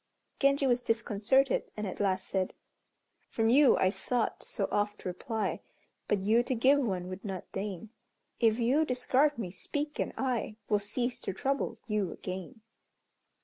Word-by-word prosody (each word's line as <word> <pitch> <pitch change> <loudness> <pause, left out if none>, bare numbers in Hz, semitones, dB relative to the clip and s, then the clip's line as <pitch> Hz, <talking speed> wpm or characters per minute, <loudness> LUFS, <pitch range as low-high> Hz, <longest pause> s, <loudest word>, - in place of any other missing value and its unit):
Genji 275 0 +3
was 245 -1 +3
disconcerted, 230 +3 +1
and 210 - -2
at 190 - -5
last 190 -2 0
said, 190 -1 -1 0.7
"From 225 0 +2
you 280 +1 +6
I 185 - +3
sought 240 +3 -1
so 195 - -3
oft 205 0 -1
reply, 210 +5 -2 0.5
But 200 -2 +1
you 220 +4 +4
to 250 +1 -1
give 265 +5 +5
one 190 -9 -1
would 185 +1 -7
not 195 -4 -6
deign, 200 +1 -5 0.5
If 225 -2 +4
you 250 +6 +3
discard 265 +2 +2
me, 195 -7 -4
speak, 295 - -3
and - - 0
I 250 -5 -1
Will 210 - +3
cease 240 +5 -2
to 195 - -3
trouble 275 +7 -1
you 210 -6 -1
again." 190 +6 -7
225 Hz, 155 wpm, -30 LUFS, 195-255 Hz, 0.7 s, you